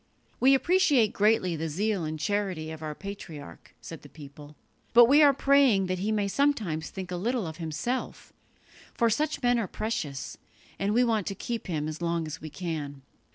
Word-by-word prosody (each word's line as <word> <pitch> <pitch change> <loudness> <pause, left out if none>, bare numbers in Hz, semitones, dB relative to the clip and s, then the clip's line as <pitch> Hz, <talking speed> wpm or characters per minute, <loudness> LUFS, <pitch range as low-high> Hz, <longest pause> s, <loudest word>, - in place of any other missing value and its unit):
"We 270 +1 +6
appreciate 290 - +3
greatly 205 -4 +2
the 160 +1 -3
zeal 195 +2 -1
and 155 0 -4
charity 185 -2 -2
of 160 -1 -8
our 155 -1 -5
patriarch," 165 - -10
said - - -9
the - - -14
people, 145 0 -13 0.4
"but 240 0 +9
we 285 +5 +5
are 290 -1 +7
praying 275 -7 +3
that 185 0 -2
he 205 +4 -1
may 205 -2 0
sometimes 200 - 0
think 185 -2 -7
a - - -2
little 230 +4 -1
of 160 -1 -7
himself; 165 +10 -4 0.6
for 235 -1 +2
such 300 +4 -1
men 245 -1 +3
are 220 - -2
precious, 165 -12 -4 0.4
and 200 +2 0
we 245 - +5
want 220 -5 0
to 195 - -3
keep 230 +3 -5
him 155 -4 -2
as 155 +1 -6
long 170 -1 -1
as 155 +1 -7
we 155 - -7
can." 150 -4 -5
195 Hz, 190 wpm, -27 LUFS, 155-235 Hz, 0.6 s, but